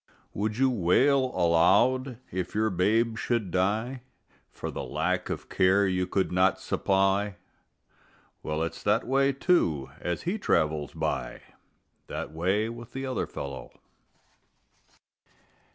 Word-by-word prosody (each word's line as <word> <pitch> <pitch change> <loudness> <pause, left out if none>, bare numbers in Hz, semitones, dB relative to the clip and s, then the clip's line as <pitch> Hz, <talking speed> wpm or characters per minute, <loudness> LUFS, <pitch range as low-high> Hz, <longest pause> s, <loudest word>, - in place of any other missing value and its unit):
Would 105 +2 -2
you 130 0 +3
wail 130 +7 +3
aloud 110 +7 +3
if 90 +1 -4
your 110 0 +1
babe 110 +5 +1
should 115 -7 -1
die 110 +8 0 0.5
For - - -6
the - - -5
lack - - -1
of - - -5
care 95 +2 +3
you 90 -1 0
could 95 0 0
not 90 +1 +3
supply? 95 +1 +1 1.1
Well, 75 +1 -2
it's 85 0 -5
that 105 +3 +1
way, 135 +1 +2
too, 130 - +1
as 90 -1 -3
he 195 +6 -2
travels 75 - 0
by, - - -3 0.6
That - - -5
way 95 +7 0
with 115 0 -9
the 135 0 -4
other 130 -1 -2
fellow. 70 -2 -7
100 Hz, 125 wpm, -27 LUFS, 90-120 Hz, 1.1 s, you